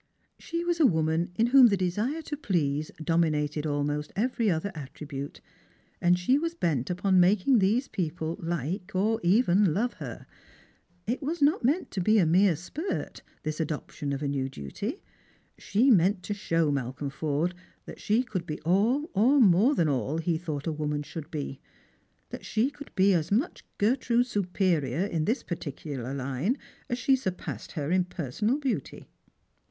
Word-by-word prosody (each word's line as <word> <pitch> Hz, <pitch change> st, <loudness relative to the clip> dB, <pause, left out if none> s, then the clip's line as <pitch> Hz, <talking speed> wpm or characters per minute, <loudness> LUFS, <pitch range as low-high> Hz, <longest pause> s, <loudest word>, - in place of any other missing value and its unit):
She 335 Hz, 0 st, -3 dB
was 345 Hz, -1 st, 0 dB
a 315 Hz, -, +6 dB
woman 160 Hz, -1 st, +1 dB
in 225 Hz, -, +3 dB
whom 265 Hz, -3 st, +9 dB
the 200 Hz, -3 st, +2 dB
desire 210 Hz, -, -1 dB
to 300 Hz, -, -4 dB
please 155 Hz, -, -1 dB
dominated 155 Hz, -2 st, +1 dB
almost 145 Hz, 0 st, -1 dB
every 230 Hz, 0 st, +1 dB
other 180 Hz, +3 st, -1 dB
attribute, 145 Hz, -1 st, -7 dB, 0.6 s
and 175 Hz, +1 st, +4 dB
she 250 Hz, +11 st, +2 dB
was 330 Hz, +2 st, -2 dB
bent 150 Hz, -, 0 dB
upon 185 Hz, +1 st, +2 dB
making 205 Hz, +7 st, +4 dB
these 220 Hz, +8 st, +2 dB
people 165 Hz, -2 st, -3 dB
like 175 Hz, +4 st, -3 dB
or 220 Hz, +4 st, +2 dB
even 190 Hz, -2 st, +3 dB
love 240 Hz, +4 st, 0 dB
her. -, -, -7 dB, 0.8 s
It 240 Hz, +7 st, -2 dB
was 315 Hz, +5 st, -2 dB
not 295 Hz, +5 st, +3 dB, 0.3 s
to 190 Hz, -, -2 dB
be 215 Hz, +5 st, +4 dB
a 190 Hz, -, +5 dB
mere 180 Hz, +2 st, +4 dB
spurt, 295 Hz, -, -5 dB, 0.2 s
this 155 Hz, +1 st, -3 dB
adoption 150 Hz, -2 st, -3 dB
of 140 Hz, +1 st, -3 dB
a -, -, 0 dB
new 135 Hz, -1 st, -1 dB
duty. 200 Hz, -, -6 dB, 0.6 s
She 245 Hz, +7 st, +3 dB
meant 190 Hz, -1 st, +3 dB
to 205 Hz, -, -3 dB
show 165 Hz, -6 st, 0 dB
Malcolm 135 Hz, +1 st, -3 dB
Forde 155 Hz, +4 st, -1 dB, 0.3 s
that -, -, -10 dB
she 220 Hz, +4 st, +2 dB
could 185 Hz, -8 st, -5 dB
be 150 Hz, -, -4 dB
all, 215 Hz, -, +2 dB
or 250 Hz, +9 st, +4 dB
more 215 Hz, +5 st, +5 dB
than 165 Hz, -, +2 dB
all, 135 Hz, +1 st, -1 dB
he 165 Hz, +1 st, 0 dB
thought 155 Hz, -5 st, -4 dB
a 165 Hz, -, 0 dB
woman 150 Hz, -1 st, -2 dB
should 155 Hz, +1 st, -8 dB
be 140 Hz, -4 st, -5 dB, 0.3 s
— -, -, -41 dB
that -, -, -7 dB
she 230 Hz, +6 st, 0 dB
could 290 Hz, 0 st, -11 dB
be 195 Hz, 0 st, +4 dB
as 165 Hz, -1 st, 0 dB
much 245 Hz, -, 0 dB
Gertrude's 240 Hz, +2 st, +2 dB
superior 180 Hz, -6 st, 0 dB
in 165 Hz, -6 st, -1 dB
this 235 Hz, +6 st, 0 dB
particular 140 Hz, -6 st, -5 dB
line 140 Hz, -, -1 dB, 0.3 s
as 240 Hz, -, -1 dB
she 265 Hz, +2 st, +3 dB
surpassed 190 Hz, -8 st, -5 dB
her 150 Hz, -2 st, -3 dB
in 185 Hz, 0 st, +3 dB
personal 180 Hz, -, -1 dB
beauty. 275 Hz, -4 st, -3 dB
180 Hz, 170 wpm, -28 LUFS, 150-225 Hz, 0.8 s, whom